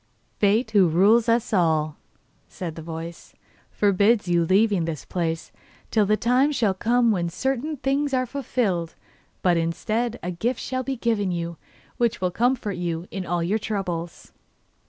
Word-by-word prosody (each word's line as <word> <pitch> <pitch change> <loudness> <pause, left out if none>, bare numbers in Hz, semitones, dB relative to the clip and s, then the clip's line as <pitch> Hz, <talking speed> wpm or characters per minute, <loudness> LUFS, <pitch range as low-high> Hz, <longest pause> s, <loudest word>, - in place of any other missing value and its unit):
'Fate, 215 +3 +2
who 200 -4 +5
rules 210 +8 +4
us 230 -1 +1
all,' 160 -5 +2 0.5
said 170 -3 -6
the 160 - -8
voice, 165 +1 -8 0.3
'forbids 205 +1 +2
your 175 -1 +3
leaving 195 -2 +3
this 160 -3 -5
place 165 -2 -3 0.4
till 215 -3 +3
the 215 +1 +3
time 255 +6 +3
shall 230 -9 +1
come 235 +4 +2
when 175 -4 0
certain 270 - -2
things 275 +2 0
are 255 -1 +1
fulfilled. 225 - -2 0.5
But, 175 -2 +3
instead, 215 +8 -1
a 180 - -2
gift 230 +8 -2
shall 255 -1 -2
be 270 +1 -3
given 225 -5 0
you, 170 -1 -4 0.4
which 235 -1 +1
will 180 -1 0
comfort 235 -2 0
you 170 0 -3
in 190 -2 -5
all 175 0 0
your 200 +6 0
troubles. 180 -6 -4
200 Hz, 155 wpm, -24 LUFS, 170-235 Hz, 0.5 s, who